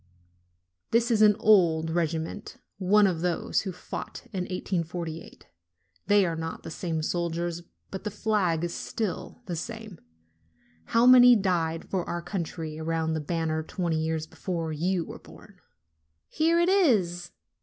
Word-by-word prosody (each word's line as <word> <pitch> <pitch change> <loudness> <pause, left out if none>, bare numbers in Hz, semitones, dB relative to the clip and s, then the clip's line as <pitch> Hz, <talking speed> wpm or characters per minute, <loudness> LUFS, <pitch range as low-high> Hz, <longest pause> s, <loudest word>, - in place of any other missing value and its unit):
This 235 +1 +2
is 220 -2 +3
an 210 -1 +7
old 165 -6 +4
regiment, 165 +4 -3 0.2
one 205 +2 +4
of 175 -4 0
those 175 -1 0
which 190 -4 -5
fought - - -7
in 185 -2 -2
1848. 170 -3 -4 0.6
They 205 -1 +5
are 165 -2 -1
not 160 0 -5
the - - -7
same 160 -2 -3
soldiers, 170 0 -2 0.3
but 190 - -6
the 210 - -2
flag 200 -6 0
is 175 - -2
still 225 +3 -4
the 180 -4 -4
same. 220 +1 -7 0.9
How 230 +1 +3
many 250 -1 +9
died 170 -5 0
for 185 -2 -1
our 175 0 -3
country 165 -5 -5
around 160 0 -1
that 155 -2 -4
banner 160 -2 -1
twenty 165 0 -2
years 160 -1 -2
before 165 -1 -4
you 175 +2 0
were - - -9
born!" - - -16 0.7
"Here 330 +2 +2
it 345 - +3
is!" 200 - +2
175 Hz, 145 wpm, -27 LUFS, 165-205 Hz, 0.9 s, many